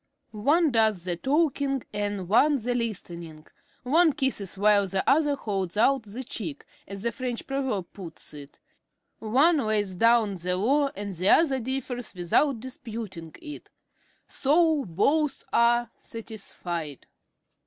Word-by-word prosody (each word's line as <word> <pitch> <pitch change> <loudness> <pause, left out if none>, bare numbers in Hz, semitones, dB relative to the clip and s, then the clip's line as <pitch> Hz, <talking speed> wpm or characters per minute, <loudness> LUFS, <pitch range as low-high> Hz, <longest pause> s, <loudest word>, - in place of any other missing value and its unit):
One 295 +9 +2
does 220 -6 +2
the 175 -1 -2
talking 275 - 0
and 205 -3 -3
one 285 - +4
the 245 -1 -1
listening. 170 -9 -5 0.4
One 315 +5 +4
kisses 265 - -2
while 205 0 +4
the 190 0 -2
other 295 0 +3
holds 195 -7 -3
out 270 +4 +4
the 220 +4 -7
cheek, 170 - -6 0.2
as 195 +1 -7
the 235 - 0
French 245 0 -4
proverb 265 -10 -3
puts 175 -5 -7
it; 145 -1 -11 0.6
one 275 +10 +3
lays 215 -5 0
down 225 0 +3
the 180 +1 -2
law 275 +9 +2
and 200 -1 -5
the 185 +2 0
other 275 -5 +4
differs 250 -2 -4
without 225 - +1
disputing 225 - -7
it, 300 -1 -9 0.6
so 310 0 +2
both 275 - +1
are 235 0 +3
satisfied. 175 - -6
225 Hz, 130 wpm, -26 LUFS, 195-270 Hz, 0.6 s, one